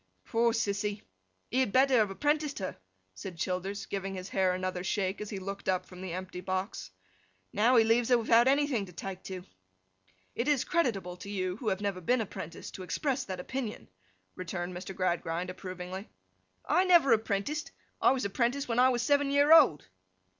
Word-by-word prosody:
'Poor 230 +1 +2
Sissy! 205 -2 -1 0.5
He 255 - +2
had 260 -6 +2
better 260 +1 +5
have 215 -3 +3
apprenticed 295 +7 0
her,' 190 -2 -4 0.4
said 165 - -8
Childers, 190 +4 -3
giving 195 -1 -4
his 185 0 -6
hair 190 -1 +2
another 185 -1 -3
shake, 190 +1 -1
as 210 - -5
he 200 - -4
looked 195 +1 -5
up 185 -1 +1
from 180 0 -12
the 185 -2 -5
empty 185 0 -6
box. 185 - -3 0.6
'Now, 230 +5 +4
he 230 - +7
leaves 230 +2 +2
her 245 - +6
without 230 +1 +4
anything 275 -7 +2
to 180 - -13
take 185 +3 -6
to.' 185 -2 -7 0.9
'It 235 - -2
is 290 -4 +3
creditable 200 - -1
to 200 +3 -9
you, 185 -2 -2
who 230 - -7
have 190 +1 -1
never 200 -3 -2
been 245 +8 +2
apprenticed, 170 -6 -6
to - - -8
express 260 - -1
that 185 -2 -5
opinion,' 235 +3 -5 0.5
returned 180 0 -4
Mr. 185 +1 -7
Gradgrind, 175 -1 -1
approvingly. 185 +1 -7 0.6
'I 370 - +3
never 340 -9 +6
apprenticed? 225 +8 -1 0.3
I - - +6
was 260 -5 +1
apprenticed 245 +7 0
when 235 0 0
I 255 +1 +6
was 240 -2 0
seven 285 +1 +3
year 285 +2 +5
old. 245 - +6
200 Hz, 180 wpm, -30 LUFS, 185-250 Hz, 0.9 s, he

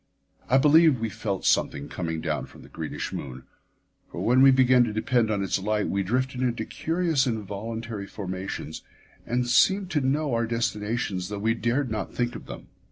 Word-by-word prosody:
I 130 - +5
believe 150 0 +5
we 115 0 -2
felt 100 -2 -4
something 70 0 +1
coming 80 -2 -4
down 75 -4 -2
from - - -15
the - - -15
greenish - - -5
moon, 65 -1 -6 0.7
for - - -4
when 125 +3 +4
we 135 - +8
began 130 -1 +5
to 115 - -3
depend 115 +1 +1
on 100 -2 0
its 95 - 0
light 105 +1 -1
we 100 - 0
drifted 125 +6 -1
into 120 -3 -1
curious 165 -4 0
involuntary 110 0 -4
formations 95 -6 -6 0.5
and 125 0 0
seemed 190 +9 +3
to 150 - +1
know 140 +1 0
our 115 0 +1
destinations 110 -5 -2
though 105 - -4
we 110 +3 +1
dared 120 +2 -1
not 105 -3 -4
think 120 0 -1
of - - -9
them. - - -8
115 Hz, 180 wpm, -26 LUFS, 100-130 Hz, 0.7 s, we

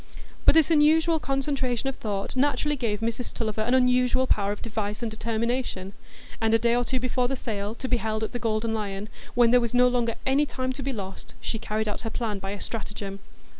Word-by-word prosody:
But - - +7
this 320 0 +5
unusual 320 +2 +4
concentration 270 -3 -1
of 270 - -1
thought 200 0 -3
naturally 290 +2 +2
gave 225 -5 -2
Mrs 230 +2 -2
Tulliver 220 -2 -2
an 245 +4 +2
unusual 250 0 +3
power 200 -5 +1
of 205 - -6
device 215 -1 -3
and 225 - -2
determination: 225 -3 -2 0.5
and 225 0 +4
a - - +7
day 235 +1 +2
or 245 - +2
two 255 +1 0
before 250 0 0
the 270 - -1
sale, 210 -3 -4
to 260 - -4
be 250 - +2
held 220 -1 -2
at 220 - -2
the 245 - -3
Golden 225 0 0
Lion, 205 -1 -3 0.3
when 240 -1 +5
there 250 0 +6
was 235 0 -2
no 250 0 +6
longer 240 -2 +1
any 280 +3 +3
time 255 -1 -2
to 275 - -5
be 275 +1 -2
lost, 195 -5 -7
she 225 - -3
carried 215 0 -2
out 210 - -2
her 225 - -3
plan 220 -3 -2
by 195 0 -5
a 200 0 -4
stratagem. 205 -3 -5
235 Hz, 220 wpm, -26 LUFS, 215-255 Hz, 0.5 s, But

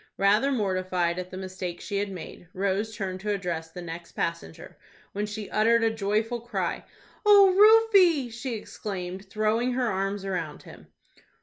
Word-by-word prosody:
Rather 210 +8 +3
mortified 185 -6 0
at 180 0 -6
the 185 - -8
mistake 185 -2 -6
she 200 - -4
had 205 0 -2
made, 175 -1 -9
Rose 200 +3 -1
turned 190 -3 -4
to 210 +2 -5
address 175 -5 -2
the 175 +2 -9
next 170 0 -8
passenger, 80 - -5 0.4
when 205 +1 -3
she 210 -1 -6
uttered 230 +2 +3
a 225 - +3
joyful 220 +2 -1
cry. 240 - -3 0.4
"O 400 -3 +7
Rufie!" 400 - +6
she 240 0 -4
exclaimed, 190 -3 -6
throwing 220 +4 0
her 245 -3 0
arms 195 +1 -2
around 190 -2 -4
him. - - -14
205 Hz, 160 wpm, -26 LUFS, 185-235 Hz, 0.4 s, O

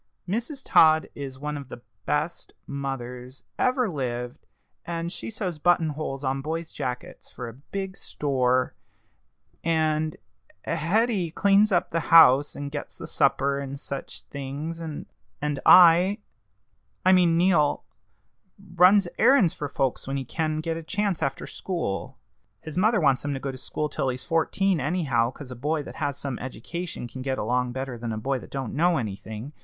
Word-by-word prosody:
Mrs. 240 - -3
Todd 160 0 +5
is 135 -2 -7
one 150 +2 -4
of 140 -2 -9
the 120 - -10 0.2
best 155 +3 -2
mothers 130 -2 -6 0.2
ever 255 -1 +2
lived, 125 -7 -4 0.4
and 170 0 -4
she - - -6
sews 185 -7 -4
button 170 0 +3
holes 145 -2 -4
on 135 0 -1
boys' 160 +3 -4
jackets 125 -1 -6
for 125 - -7
a 115 - -8
big 190 - -6
store; 130 -6 0 0.9
and 155 -1 +1 0.5
Hetty 185 +3 +1
cleans 200 +5 +4
up 175 -1 +1
the 165 - +1
house, 145 -4 +7
and 145 0 -5
gets 145 -1 -6
the - - -7
supper, 140 0 +1
and 140 0 -6
such 140 -1 -7
things; 140 +4 -6
and 160 -3 -6 0.6
I 180 +3 +8 0.9
I 185 - +7
mean 175 -3 +5
Neal 170 -5 +3 0.9
runs 180 +2 +6
errands 235 - +5
for 145 - -5
folks 135 -2 -1
when 135 +1 -2
he 135 - -4
can 155 +3 -2
get 165 0 -2
a - - -5
chance 200 +1 -1
after 135 0 -2
school. 170 - -4 0.4
His 155 -2 -8
mother 210 +4 +3
wants 140 -5 +3
him 145 -1 -2
to - - -4
go 135 0 -3
to - - -9
school 150 +3 -3
till 135 -2 -2
he's 130 0 -4
fourteen 175 +2 +1
anyhow, 140 -6 +1
'cause 130 0 -10
a - - -6
boy 150 +5 -1
that - - -10
has 140 -1 -2
some 135 -4 -4
education 130 +4 -6
can 130 +2 -8
get 130 0 -2
along 125 +2 0
better 130 -2 -5
than 115 -1 -4
a 110 - -3
boy 135 +4 -1
that - - -12
don't 135 -4 -4
know 170 +3 +3
anything. 110 +4 -5
150 Hz, 165 wpm, -26 LUFS, 135-170 Hz, 0.9 s, I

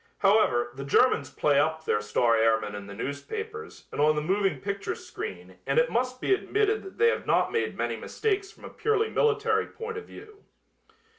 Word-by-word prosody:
However, 195 - +3
the 135 +2 -7
Germans 140 - +3
play 145 0 +2
up 160 +2 0
their 105 - +1
star 115 +3 +2
airmen 110 -2 +2
in 100 -1 -7
the 100 - -9
newspapers 435 - -6
and - - -2
on 155 +1 +4
the 150 - 0
moving 195 +3 +1
picture 200 0 -3
screen 365 - -8
and - - +1
it - - +3
must 255 +1 -1
be 390 - +2
admitted 425 +2 +1
that 385 - -11
they 460 +2 +5
have - - -2
not - - +2
made 455 - -1
many - - -1
mistakes 400 -2 -2
from - - -15
a - - -7
purely 440 0 0
military 440 0 +2
point 450 -1 -7
of - - -12
view. 425 -1 -14
220 Hz, 195 wpm, -27 LUFS, -, -, they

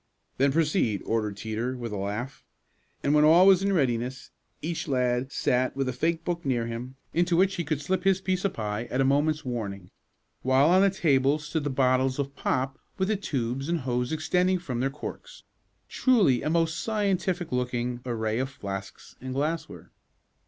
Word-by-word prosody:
"Then 135 +1 +3
proceed," 150 - +1
ordered 110 -3 -1
Teeter 115 +4 -3
with 120 -2 -5
a - - -3
laugh; 105 +7 -4 0.6
and 140 - +2
when 150 0 +5
all 165 +4 +7
was 195 -1 +6
in 200 0 +1
readiness 130 -5 -1 0.3
each 165 +1 -3
lad 125 -1 0
sat 130 0 +1
with 135 -1 -1
a 130 - -1
fake 165 +5 -1
book 170 -1 -2
near 125 -4 0
him, 120 +3 -6 0.2
into 175 0 +2
which 190 +2 +3
he 175 - -2
could 155 -2 -2
slip 185 +5 -1
his 190 -1 +3
piece 185 -1 -1
of 200 - 0
pie 105 +1 -3
at 125 +2 -3
a 135 - +4
moment's 145 +3 +1
warning, 100 -7 -5 0.5
while 130 +5 +4
on 185 +1 +6
the 200 - +5
table 145 -6 +2
stood 155 0 -3
the 145 - -1
bottles 130 0 +2
of 140 0 -3
pop 130 +1 -1 0.2
with 190 0 0
the 215 - +2
tubes 135 - -3
and 170 -2 0
hose 125 -1 -1
extending 180 +4 +1
from 130 -9 -4
their 135 +2 +1
corks - - -9 0.4
truly 210 - +3
a - - -1
most 165 -1 +1
scientific 195 -5 -1
looking 125 -1 -1
array 110 -2 -1
of 130 +1 -1
flasks 100 -6 -7
and 130 0 -5
glassware. 155 +4 -3
135 Hz, 185 wpm, -27 LUFS, 125-170 Hz, 0.6 s, all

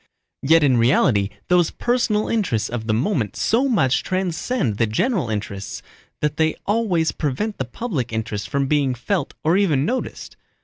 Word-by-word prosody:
Yet 160 +3 +4
in 130 -4 +4
reality 115 -4 +3 0.2
those 175 -2 +3
personal 235 -3 0
interests 190 - 0
of 115 -2 -4
the - - +1
moment 125 - -1
so 255 +5 +1
much 135 - +2
transcend 185 - -1
the 115 - +2
general 170 - 0
interests 100 -2 -5 0.4
that 150 0 -1
they 160 -1 +2
always 200 -7 +1
prevent 165 +9 -3
the 130 - -1
public 145 - -4
interest 110 -2 -3
from 140 -1 0
being 140 -2 +1
felt 180 - -2
or 165 +4 +3
even 155 -9 +2
noticed. 255 +7 -4
150 Hz, 160 wpm, -21 LUFS, -, 0.4 s, Yet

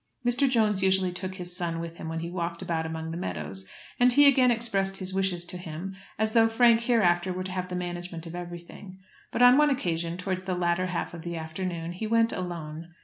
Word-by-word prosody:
Mr. 245 +3 +3
Jones 215 -5 +2
usually 190 -1 +3
took 185 +1 -5
his 180 -1 -5
son 170 -2 -2
with 170 0 -6
him 160 - -6
when 165 0 -3
he 170 - -4
walked 170 -1 -3
about 160 -1 -1
among 160 0 -5
the 165 - -4
meadows, 95 - -5 0.3
and 250 0 +6
he 290 +3 +7
again 260 -2 +6
expressed 195 -5 +1
his 185 -1 -4
wishes 190 -2 0
to 180 - -6
him 175 +3 -6 0.2
as 220 0 0
though 225 -1 +6
Frank 230 0 +5
hereafter 185 -7 +2
were 185 +1 -3
to 185 - -5
have 185 -1 -3
the 180 - -4
management 175 -1 -5
of 165 - -8
everything. 175 +2 -8 0.3
But 245 - +2
on 250 +3 +8
one 300 0 +5
occasion, 170 - -1
towards 185 0 -2
the 185 -1 -2
latter 175 +1 +1
half 180 -1 -3
of 170 - -7
the 170 0 -5
afternoon, 165 +1 -4
he 185 +5 -4
went 230 +1 +3
alone. 170 -3 -5
180 Hz, 220 wpm, -27 LUFS, 170-205 Hz, 0.3 s, on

